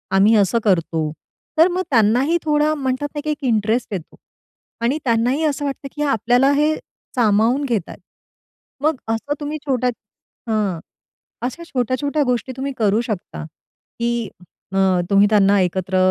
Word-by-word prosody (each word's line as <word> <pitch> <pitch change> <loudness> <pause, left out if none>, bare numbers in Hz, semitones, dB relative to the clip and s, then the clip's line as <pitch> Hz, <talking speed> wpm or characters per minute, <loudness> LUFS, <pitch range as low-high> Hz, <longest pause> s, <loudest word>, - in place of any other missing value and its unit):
आम्ही 205 +4 +5
असं 205 +2 +3
करतो." 165 -5 +1 0.5
तर 325 +2 +7
मग 365 +1 -1
त्यांनाही 250 +7 +3
थोडा, 300 0 +2
म्हणतात 270 0 -2
ना, - - -2
की 305 - -3
एक 300 -1 -3
इंटरेस्ट 225 -1 0
येतो. 175 -5 -6 0.7
आणि 245 +5 +1
त्यांनाही 245 +5 +1
असं 290 -1 -1
वाटतं, 275 0 -4
की 295 - -4
आपल्याला 250 0 +3
हे 300 +2 +2 0.4
सामावून 230 +3 +3
घेतायेत. 225 -9 -3 0.8
मग 310 +1 +3
असं 225 +6 -1
तुम्ही 295 +1 -4
छोट्या 255 -3 +1 0.6
हं, 205 -6 0 0.6
अशा 260 +8 -4
छोट्या-छोट्या 280 +1 -1
गोष्टी 250 -1 -1
तुम्ही 275 +1 -3
करू 215 0 +2
शकता, 215 -8 -5 0.6
की 235 -2 -1 0.4
अ, 195 - -2 0.3
तुम्ही 200 0 +5
त्यांना 205 -1 +4
एकत्र 185 +1 -1
245 Hz, 140 wpm, -20 LUFS, 210-285 Hz, 0.8 s, तर